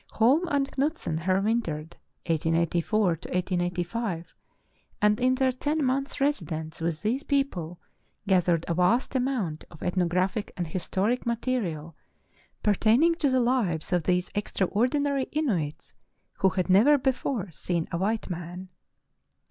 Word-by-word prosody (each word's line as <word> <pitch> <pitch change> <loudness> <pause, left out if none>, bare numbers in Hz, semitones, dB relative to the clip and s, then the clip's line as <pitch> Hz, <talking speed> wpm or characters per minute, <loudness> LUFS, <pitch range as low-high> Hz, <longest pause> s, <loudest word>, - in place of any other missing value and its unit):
Holm 275 +10 +3
and 280 -3 +1
Knutsen 280 - -1
here 185 0 +3
wintered, 170 -8 -1 0.3
1884 170 +3 +1 0.7
5, 180 -4 -4 0.6
and 210 0 +3
in 255 +1 +3
their 260 0 +2
ten 290 +4 -1
months' 270 +3 -1
residence 165 - -2
with 165 -1 -2
these 245 +6 0
people 195 - -1 0.5
gathered 175 -3 +2
a 170 - 0
vast 180 +11 +2
amount 250 - -1
of 155 - -12
ethnographic 185 +3 0
and 175 - -1
historic 195 +8 -1
material 205 - -2 0.7
pertain 215 - +4
ing 335 0 +5
to 320 -4 +1
the 260 -1 +3
lives 220 -11 0
of 175 - +3
these 180 +1 0
extraordinary 255 - 0
Inuits, 195 - -2 0.5
who 190 - +4
had 185 -1 -1
never 220 +11 +6
before 255 -7 -1
seen 165 +1 -2
a 170 - -2
white 215 +4 -1
man. 175 +1 -6
200 Hz, 130 wpm, -27 LUFS, 170-255 Hz, 0.7 s, never